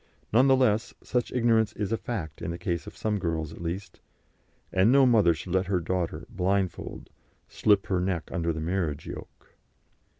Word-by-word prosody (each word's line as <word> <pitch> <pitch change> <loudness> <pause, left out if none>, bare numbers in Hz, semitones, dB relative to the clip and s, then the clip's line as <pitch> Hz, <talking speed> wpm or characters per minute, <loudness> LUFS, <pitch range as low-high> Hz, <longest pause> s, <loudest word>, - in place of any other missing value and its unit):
None 125 +4 +6
the 135 - +6
less, 115 -4 +1
such 125 -2 -1
ignorance 115 -3 +2
is 105 0 -3
a - - +3
fact 85 -11 -5
in - - -3
the 85 - -3
case 85 -3 -3
of - - -10
some 105 -2 -1
girls 80 -3 -2
at - - -11
least, 85 +4 -5 0.7
and 95 +5 +4
no 135 0 +6
mother 105 -9 +5
should 90 +2 -6
let 95 -1 +2
her 95 -2 +1
daughter, 90 0 -2
blindfold, 95 0 -2 0.4
slip 105 -2 +2
her 95 -2 0
neck 90 -3 -1
under 85 0 0
the 80 -1 -4
marriage 80 -3 -2
yoke. - - -10
95 Hz, 180 wpm, -27 LUFS, 85-110 Hz, 0.7 s, None